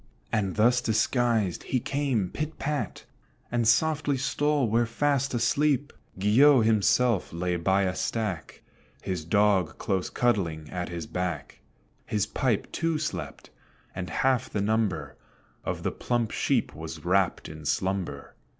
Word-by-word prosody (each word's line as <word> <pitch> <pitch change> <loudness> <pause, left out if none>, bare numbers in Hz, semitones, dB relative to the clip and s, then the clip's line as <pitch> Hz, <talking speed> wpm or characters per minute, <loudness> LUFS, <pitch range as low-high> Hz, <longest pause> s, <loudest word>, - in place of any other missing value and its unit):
And 100 -4 0
thus 120 +3 +4
disguised, 110 -3 +1
he 130 - -1
came, 130 -8 -1
pit 155 +1 -4
pat, 150 0 -3 0.5
And 120 -2 +1
softly 145 +3 +2
stole 145 0 +1
where 115 +2 +2
fast 140 +2 0
asleep 140 +4 +1 0.2
Guillot 115 +6 +5
himself 110 0 +2
lay 90 +1 -1
by 95 +3 +2
a 90 -1 0
stack, 105 -6 -3 0.4
His 90 -4 -3
dog 100 0 +2
close 95 -2 -1
cuddling 85 -10 0
at 90 -1 -3
his 85 -2 -5
back; 85 -5 -4 0.5
His 105 -1 0
pipe 115 0 -1
too 165 -1 0
slept; 155 0 -5 0.4
and 90 -1 -5
half 130 -3 +1
the 105 - -2
number 100 -9 -1 0.5
Of - - -3
the - - 0
plump 120 -3 -1
sheep - - 0
was - - -8
wrapped 95 0 +1
in 75 0 -9
slumber. 95 +4 -2
110 Hz, 135 wpm, -27 LUFS, 90-130 Hz, 0.5 s, Guillot